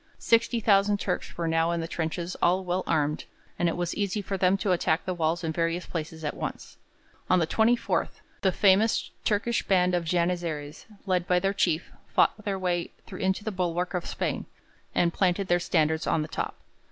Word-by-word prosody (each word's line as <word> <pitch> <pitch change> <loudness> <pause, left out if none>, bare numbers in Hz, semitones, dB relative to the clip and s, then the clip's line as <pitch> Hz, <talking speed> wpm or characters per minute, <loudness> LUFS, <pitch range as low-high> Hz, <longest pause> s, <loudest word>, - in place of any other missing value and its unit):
Sixty 230 +1 +2
thousand 205 -1 +3
Turks 180 -3 -3
were 170 -1 -1
now 165 0 +2
in 170 0 0
the 165 - -3
trenches 170 +2 -3
all 185 +2 +3
well 180 +1 -1
armed, 150 0 0 0.3
and 175 - +3
it 165 - -3
was 175 -1 -1
easy 205 0 -1
for 200 -1 -3
them 190 +1 +3
to 195 -1 0
attack 170 -2 +1
the 185 - -1
walls 165 0 0
in 160 - -1
various 165 +2 -1
places 160 -1 -5
at 150 - -1
once. - - -6 0.5
On 185 - +5
the 170 - +2
24th 225 +8 +1 0.2
the 190 - +3
famous 200 +4 +3
Turkish 220 +2 +1
band 180 -2 +2
of 175 -1 +1
Janizaries, 170 -3 -2 0.2
led 180 -2 0
by 180 - +3
their 195 +2 +1
chief, 170 -4 0 0.2
fought 215 - +2
their 200 -2 -1
way 175 -2 -1 0.2
into 190 +2 -1
the 220 - -2
bulwark 180 -1 -1
of 180 -2 -2
Spain, - - -3 0.5
and 170 -1 +2
planted 185 0 +1
their 175 0 +4
standards 160 -2 +1
on 155 - +2
the - - -6
top. - - -3
180 Hz, 190 wpm, -27 LUFS, 165-195 Hz, 0.5 s, On